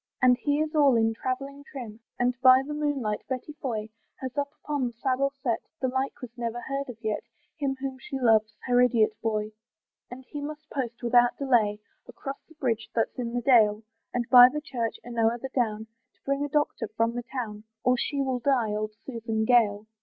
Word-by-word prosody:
And 250 Hz, 0 st, +6 dB
he 285 Hz, +4 st, 0 dB
is 310 Hz, 0 st, -2 dB
all 285 Hz, -4 st, +5 dB
in 225 Hz, 0 st, +3 dB
travelling 275 Hz, +4 st, -4 dB
trim, 240 Hz, -6 st, -8 dB, 0.2 s
And 245 Hz, +1 st, +2 dB
by 260 Hz, 0 st, +7 dB
the 295 Hz, -, -5 dB
moonlight, 285 Hz, -8 st, -1 dB
Betty 260 Hz, +3 st, -4 dB
Foy 220 Hz, -5 st, -2 dB, 0.3 s
Has 260 Hz, 0 st, -6 dB
up 285 Hz, -1 st, -1 dB
upon 290 Hz, -4 st, -1 dB
the 240 Hz, -, -7 dB
saddle 265 Hz, +3 st, 0 dB
set, 235 Hz, -3 st, 0 dB, 0.2 s
The 260 Hz, -, 0 dB
like 265 Hz, +2 st, -2 dB
was 240 Hz, -1 st, -8 dB
never 235 Hz, 0 st, -2 dB
heard 275 Hz, +2 st, -4 dB
of 240 Hz, -, -7 dB
yet, 215 Hz, -1 st, -1 dB, 0.3 s
Him 275 Hz, -3 st, -1 dB
whom 265 Hz, -1 st, -4 dB
she 270 Hz, +1 st, -5 dB
loves, 220 Hz, -3 st, +4 dB
her 245 Hz, -1 st, +4 dB
idiot 230 Hz, -3 st, +4 dB
boy. 215 Hz, -1 st, -1 dB, 0.6 s
And 255 Hz, +1 st, -10 dB
he 290 Hz, -, -6 dB
must 305 Hz, +1 st, -7 dB
post 245 Hz, -3 st, -4 dB
without 240 Hz, 0 st, +4 dB
delay 225 Hz, -6 st, +2 dB, 0.3 s
Across 275 Hz, 0 st, -7 dB
the 320 Hz, -, -18 dB
bridge 235 Hz, -6 st, -1 dB
that's 230 Hz, +2 st, 0 dB
in 235 Hz, -1 st, -2 dB
the 245 Hz, -, 0 dB
dale, 220 Hz, -4 st, +4 dB, 0.3 s
And 240 Hz, -1 st, -2 dB
by 250 Hz, -1 st, +10 dB
the 300 Hz, -, -3 dB
church, 240 Hz, -7 st, -3 dB
and 240 Hz, -1 st, -5 dB
o'er 225 Hz, +1 st, +3 dB
the 265 Hz, +3 st, -6 dB
down, 220 Hz, -5 st, -1 dB, 0.3 s
To -, -, -39 dB
bring 275 Hz, +1 st, 0 dB
a 290 Hz, -, -2 dB
doctor 290 Hz, -5 st, 0 dB
from 230 Hz, +1 st, +2 dB
the 245 Hz, -, -3 dB
town, 230 Hz, -4 st, -6 dB, 0.2 s
Or 250 Hz, -, +4 dB
she 280 Hz, +2 st, -1 dB
will 260 Hz, -2 st, -1 dB
die, 245 Hz, -4 st, +1 dB
old 215 Hz, 0 st, -2 dB
Susan 225 Hz, -3 st, -2 dB
Gale. 220 Hz, -4 st, +3 dB
245 Hz, 205 wpm, -27 LUFS, 225-275 Hz, 0.6 s, by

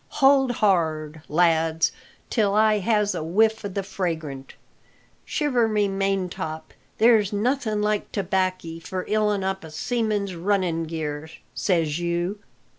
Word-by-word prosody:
"Hold 270 Hz, -2 st, +5 dB
hard, 160 Hz, -7 st, 0 dB
lads, 165 Hz, 0 st, +2 dB, 0.4 s
till 205 Hz, -4 st, +2 dB
I 215 Hz, 0 st, +4 dB
has 210 Hz, 0 st, +1 dB
a -, -, -3 dB
whiff 220 Hz, +7 st, +2 dB
o' -, -, -2 dB
the 195 Hz, 0 st, -3 dB
fragrant! 160 Hz, -8 st, -4 dB, 0.7 s
Shiver 255 Hz, -7 st, +1 dB
my 215 Hz, -1 st, +1 dB
maintop! 195 Hz, -5 st, -2 dB, 0.2 s
there's 220 Hz, -3 st, +4 dB
nothing 215 Hz, 0 st, 0 dB
like 210 Hz, 0 st, -1 dB
tobackie 185 Hz, -3 st, -1 dB
for 185 Hz, +2 st, -5 dB
ilin' 210 Hz, -2 st, +1 dB
up 190 Hz, 0 st, -2 dB
a 160 Hz, -, -9 dB
seaman's 205 Hz, +3 st, -1 dB
runnin' 175 Hz, -2 st, 0 dB
gear, 155 Hz, -1 st, -4 dB, 0.2 s
says 165 Hz, -4 st, 0 dB
you!" 175 Hz, +3 st, -2 dB
195 Hz, 125 wpm, -24 LUFS, 165-215 Hz, 0.7 s, Hold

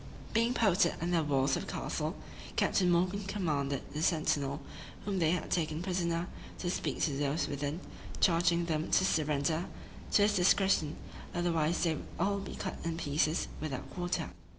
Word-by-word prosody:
Being 230 Hz, +2 st, +2 dB
posted 190 Hz, -5 st, +4 dB
under 175 Hz, +1 st, +1 dB
the 160 Hz, -, +2 dB
walls 135 Hz, -2 st, +2 dB
of -, -, -4 dB
the -, -, -4 dB
castle, -, -, -2 dB, 0.4 s
Captain 180 Hz, -2 st, +3 dB
Morgan 180 Hz, +4 st, +2 dB
commanded 150 Hz, -9 st, -1 dB
the 150 Hz, -, -3 dB
sentinel, 150 Hz, -4 st, +1 dB, 0.5 s
whom 200 Hz, -2 st, -1 dB
they 160 Hz, -2 st, +3 dB
had 180 Hz, +2 st, -1 dB
taken 155 Hz, -1 st, 0 dB
prisoner, 175 Hz, -2 st, 0 dB, 0.3 s
to 175 Hz, -, -2 dB
speak -, -, -2 dB
to 145 Hz, -4 st, +1 dB
those 145 Hz, +2 st, 0 dB
within, 145 Hz, +3 st, -3 dB, 0.4 s
charging 170 Hz, -1 st, +3 dB
them 160 Hz, -2 st, -1 dB
to 185 Hz, -, +4 dB
surrender 155 Hz, +2 st, +1 dB, 0.5 s
to -, -, +6 dB
his 210 Hz, -, +4 dB
discretion; 180 Hz, -4 st, +3 dB, 0.4 s
otherwise 170 Hz, -2 st, +1 dB
they 170 Hz, -, +3 dB
should 160 Hz, -, -4 dB
all 200 Hz, +3 st, +1 dB
be 195 Hz, -, -6 dB
cut 190 Hz, -, -4 dB
in 165 Hz, -1 st, -2 dB
pieces, 155 Hz, +1 st, +1 dB
without 145 Hz, -5 st, -4 dB
quarter. 180 Hz, -1 st, -2 dB
170 Hz, 165 wpm, -32 LUFS, 150-180 Hz, 0.5 s, to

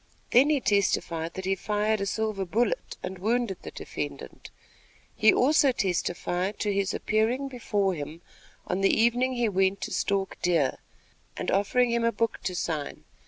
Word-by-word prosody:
Then 265 Hz, +5 st, +6 dB
he 300 Hz, -2 st, +3 dB
testified 170 Hz, -6 st, 0 dB
that 190 Hz, -, -5 dB
he 190 Hz, -, +2 dB
fired 210 Hz, +2 st, 0 dB
a 200 Hz, -, -1 dB
silver 215 Hz, -1 st, -1 dB
bullet 235 Hz, -, -1 dB
and 190 Hz, 0 st, -5 dB
wounded 225 Hz, -1 st, 0 dB
the -, -, -7 dB
defendant. -, -, -7 dB, 0.7 s
He 215 Hz, 0 st, +6 dB
also 280 Hz, +1 st, +4 dB
testified 185 Hz, -2 st, -1 dB
to 205 Hz, -1 st, 0 dB
his 195 Hz, -1 st, 0 dB
appearing 235 Hz, +6 st, 0 dB
before 205 Hz, -6 st, 0 dB
him 160 Hz, +1 st, -7 dB, 0.4 s
on 185 Hz, +2 st, -2 dB
the 195 Hz, -, +4 dB
evening 245 Hz, +3 st, +3 dB
he 240 Hz, -2 st, +1 dB
went 195 Hz, -1 st, +1 dB
to -, -, -4 dB
stalk 195 Hz, -1 st, -1 dB
deer, 165 Hz, -7 st, +1 dB, 0.6 s
and -, -, -2 dB
offering 235 Hz, +5 st, +2 dB
him 235 Hz, 0 st, +1 dB
a 230 Hz, -, +3 dB
book 230 Hz, +1 st, -1 dB
to 180 Hz, -, -2 dB
sign. 155 Hz, -4 st, -3 dB
205 Hz, 165 wpm, -27 LUFS, 185-235 Hz, 0.7 s, Then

